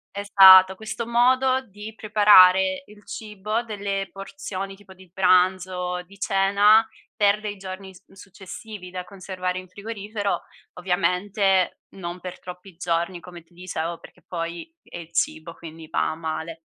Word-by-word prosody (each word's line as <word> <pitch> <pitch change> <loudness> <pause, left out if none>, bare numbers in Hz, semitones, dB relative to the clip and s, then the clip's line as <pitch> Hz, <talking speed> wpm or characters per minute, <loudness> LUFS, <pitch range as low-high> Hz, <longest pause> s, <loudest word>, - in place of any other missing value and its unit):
esatto, 190 -2 +7
questo 220 +3 -6
modo 255 +2 +3
di 210 +2 -10
preparare 210 +3 +5
il 210 -3 -18
cibo, 215 +1 -4
delle 200 -3 -4
porzioni 195 0 -7
tipo 195 -1 -17
di 185 -1 -18
pranzo, 180 -1 +1
di 195 +2 -19
cena 205 +3 +4 0.3
per 205 -1 +2
dei 210 -1 -5
giorni 190 0 -8
su 190 - -21
successivi 195 0 -11
da 180 0 -5
conservare 185 -1 -5
in 185 0 -8
frigorifero, 205 +1 -4 0.3
ovviamente 185 +1 0 0.2
non 175 -1 -7
per 180 0 -8
troppi 180 0 -11
giorni 170 +1 -2
come 175 -1 -12
ti 165 +2 -29
dicevo, 170 -2 -5
perché - - -17
poi 170 - -6
è - - -10
il 165 -1 -12
cibo, 165 0 -2
quindi 160 -1 -11
va - - 0
a 155 - -6
male. 160 0 -5
190 Hz, 145 wpm, -23 LUFS, 180-205 Hz, 0.3 s, esatto